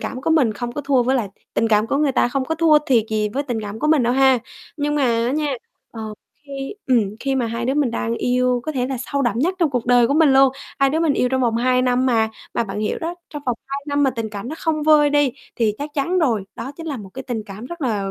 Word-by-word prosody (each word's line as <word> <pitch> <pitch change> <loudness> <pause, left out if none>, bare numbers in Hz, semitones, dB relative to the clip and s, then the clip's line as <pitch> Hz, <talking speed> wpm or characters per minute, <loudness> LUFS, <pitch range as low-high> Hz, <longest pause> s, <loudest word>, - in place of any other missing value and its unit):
cảm 255 - -5
của 320 - -1
mình 275 -9 +3
không 240 +3 -5
có 290 - -4
thua 270 -3 +2
với 260 +2 +1
lại 215 -5 -1 0.3
tình 225 - +1
cảm 215 0 +3
của 275 - 0
người 290 -2 +2
ta 240 - +2
không 265 +1 -1
có 320 - -2
thua 320 -2 +5
thiệt 235 -5 +3
gì 215 -1 0
với 275 +7 -2
tình 240 -5 -3
cảm 210 +1 -6
của - - -1
mình 305 -3 +4
đâu 240 +1 +2
ha. 265 -1 +4 0.4
Nhưng 295 0 -1
mà 290 - +1
á 235 0 +1
nha, 295 -1 0 0.4
ờ, 225 - -9 0.5
khi 275 +5 -5
ừm, 220 -6 +1
khi 270 -1 -1
mà 250 -3 0
hai 230 +1 -3
đứa 265 +3 0
mình 290 -5 +1
đang 230 0 -2
yêu 250 0 +1
có 310 - -3
thể 250 -3 -1
là 265 0 -3 0.2
sâu 280 0 +1
đậm 235 -3 0
nhất 345 +8 +1
trong 330 -4 +2
cuộc 245 -3 -2
đời 245 -1 +5
của 280 - 0
mình 310 -3 +5
luôn, 270 -1 +5 0.3
hai 275 0 +3
đứa 315 +3 0
mình 325 -3 +3
yêu 250 -2 +1
trong 260 0 0
vòng 235 -3 +1
2 250 +1 +2
năm 255 0 +2
mà, 225 -3 +2 0.3
mà 235 - +1
bạn 205 0 -5
hiểu 215 - -1
đó, 330 +2 -4 0.2
trong 295 -2 -7
vòng 245 -2 0
2 275 +1 -4
năm 285 0 +1
mà 270 - +3
tình 230 -3 -4
cảm 205 +2 -6
đó 305 - -4
không 315 -2 -1
vơi 300 -1 +5
đi 290 -3 +2 0.2
thì 220 -3 +1
chắc 290 +1 -5
chắn 340 +6 0
rồi, 235 - +1
đó 265 - -6
chính 330 - -8
là 290 -4 -3
một 205 -5 -9
cái 265 - -6
tình 240 -4 -4
cảm 200 +3 -9
rất 345 +3 -8
là, 210 -8 -1
260 Hz, 290 wpm, -21 LUFS, 235-290 Hz, 0.5 s, thua